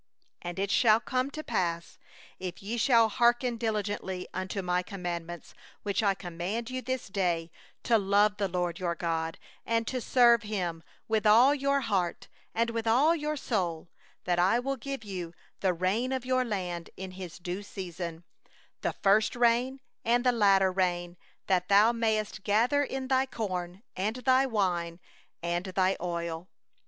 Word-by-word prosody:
11 175 0 -5
13And 195 - -1
it 200 - -2
shall 220 -2 +5
come 255 +2 -1
to 310 +2 -7
pass, 170 - -2 0.4
if 180 0 -6
ye 215 +4 -3
shall 230 -1 +4
hearken 240 +2 +2
diligently 205 -5 -3
unto 185 +1 -3
My 180 0 +1
commandments 175 -3 -6 0.3
which 205 +1 0
I 200 -2 +2
command 185 +7 -4
you 255 0 -3
this 255 0 -3
day, 175 -4 -1 0.3
to 230 -3 +3
love 205 +1 +3
the 200 -1 0
LORD 175 -2 -2
your 175 -2 -1
God, 165 -1 -2 0.3
and 230 0 0
to 255 +2 -3
serve 235 -2 +5
Him 185 -6 -3 0.3
with 220 -1 +1
all 240 +7 +7
your 280 0 +1
heart 195 -7 -1 0.3
and 230 +1 +1
with 230 0 -3
all 280 +9 +4
your 300 -1 -2
soul, 175 - -2 0.4
14that 175 -1 +1
I 190 +6 +4
will 275 +3 -1
give 275 -3 -6 0.6
the 190 - +2
rain 200 +9 0
of 260 -2 -2
your 255 0 +2
land 180 -7 -4
in 190 0 -6
its 185 -2 -8 0.3
season, 175 -3 -6 0.6
the - - -1
former 200 +2 +6
rain 245 +3 +2 0.2
and 240 +1 +2
the 250 - +5
latter 195 -4 +4
rain, 175 -2 -1 0.3
that 180 -1 +1
thou 205 +3 +6
mayest 215 -4 -1
gather 235 +8 +3
in 265 -1 -4
thy 260 0 +2
corn, 185 -5 -4
and 210 +5 -1
thy 260 +1 +3
wine, 175 -7 -1 0.4
and 175 +1 -1
thine 185 0 +1
oil. 170 0 -4
205 Hz, 160 wpm, -29 LUFS, 180-235 Hz, 0.6 s, all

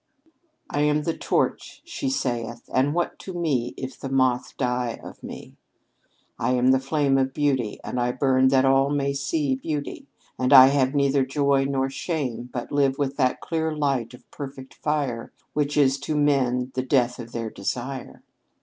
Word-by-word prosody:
"'I 145 - 0
am 150 0 +2
the 165 +1 -1
torch,' - - -1
she 325 -5 -3
saith; 120 - -3
'and 135 +4 +2
what 175 - -1
to 190 - -8
me 140 -9 -1
If 130 0 -7
the 135 - -5
moth 130 -2 +1
die 125 -2 -1
of - - -11
me? - - -10 0.8
I 125 +2 +1
am 125 +1 +4
the 130 - +4
flame 135 0 +1
Of 135 0 -1
Beauty, 130 -7 0
and 125 - -3
I 120 0 +1
burn 130 0 +3
that 130 0 +4
all 135 +1 +4
may 140 -1 0
see 140 0 0
Beauty, 145 +2 -4 0.3
and 130 +2 +2
I 130 -1 +10
have 135 0 +1
neither 140 -1 +3
joy 140 0 +1
nor 135 -1 0
shame, 130 -6 -3
But 120 - -5
live 140 -2 +2
with 140 -1 -1
that 130 -1 +1
clear 160 -2 -2
light 135 -5 -1
of - - -20
perfect 135 -2 -8
fire 140 -6 -2 0.2
Which 145 0 0
is 140 -1 +4
to 150 +2 -3
men 130 -3 +1
the 130 - -1
death 125 -2 +1
of 120 -1 -8
their 115 -2 -4
desire. 125 +6 -5
135 Hz, 175 wpm, -24 LUFS, 125-145 Hz, 0.8 s, I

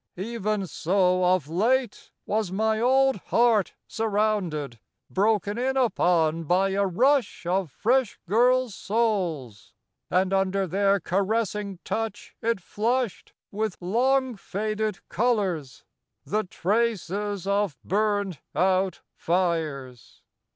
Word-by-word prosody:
Even 210 0 -2
so 185 +1 +1
of 180 -5 +2
late 230 +8 0 0.2
was 210 -3 -1
my 220 +2 +1
old 265 +1 +3
heart 230 -5 +3
surrounded, 200 - -1 0.3
broken 205 +1 +1
in 265 +2 0
upon 170 -9 +2
by 185 +5 +2
a 195 +1 +1
rush 250 +3 +1
of 180 -1 0
fresh 245 - +1
girls' 245 +3 +3
souls... 185 - -2 0.3
and 185 +1 +1
under 195 0 +1
their 195 +2 +2
caressing 200 +1 -1
touch 225 -2 -4
it 230 -2 0
flushed 230 +5 -2 0.2
with 215 -1 -2
long 255 +7 +1
faded 215 +2 -3
colours, 195 - -1 0.4
the 215 +1 0
traces 205 0 -1
of 200 -7 0
burnt 205 -4 0 0.2
out 190 0 +1
fires 155 - -2
200 Hz, 105 wpm, -25 LUFS, 180-225 Hz, 0.4 s, old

